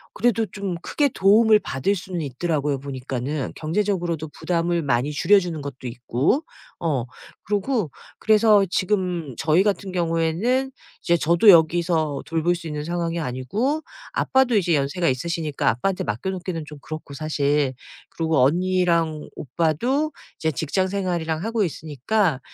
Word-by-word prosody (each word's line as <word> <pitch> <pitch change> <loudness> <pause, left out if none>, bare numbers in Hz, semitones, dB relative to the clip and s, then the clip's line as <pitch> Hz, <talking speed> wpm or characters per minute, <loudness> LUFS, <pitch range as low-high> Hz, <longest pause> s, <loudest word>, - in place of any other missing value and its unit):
그래도 230 0 +2
좀 195 -1 -4
크게 290 -2 +1
도움을 215 +1 +5
받을 165 +8 -1
수는 180 -2 -5
있더라고요 145 0 -1
보니까는. 135 +1 -4
경제적으로도 170 -2 -1
부담을 170 +1 -1
많이 130 +2 +1
줄여 200 +7 +4
주는 170 -4 -4
것도 135 -3 -7
있고. 125 - 0 0.4
어 145 -8 -1 0.4
그러고 205 - -1 0.3
그래서 215 -2 +5
지금 180 -7 -1
저희 160 +4 +3
같은 200 -2 -1
경우에는 175 +10 0 0.3
이제 170 0 +2
저도 170 +7 +4
여기서 165 -3 +4
돌볼 165 +2 +1
수 170 -1 -8
있는 150 -1 -4
상황이 170 0 -2
아니고 165 - -1 0.3
아빠도 260 -3 +2
이제 175 -5 +3
연세가 145 +5 0
있으시니까 155 +2 -1
아빠한테 180 - -1
맡겨 115 - -3
놓기는 180 -3 -4
좀 150 - -10
그렇고 155 -2 -8
사실. 145 -2 0 0.4
그리고 160 -2 0
언니랑 170 -1 +1
오빠도 235 - 0 0.3
이제 160 0 0
직장 160 +7 -1
생활이랑 175 -4 -2
하고 225 -1 0
있으니까 160 - -1
170 Hz, 340 characters per minute, -23 LUFS, 150-195 Hz, 0.4 s, 도움을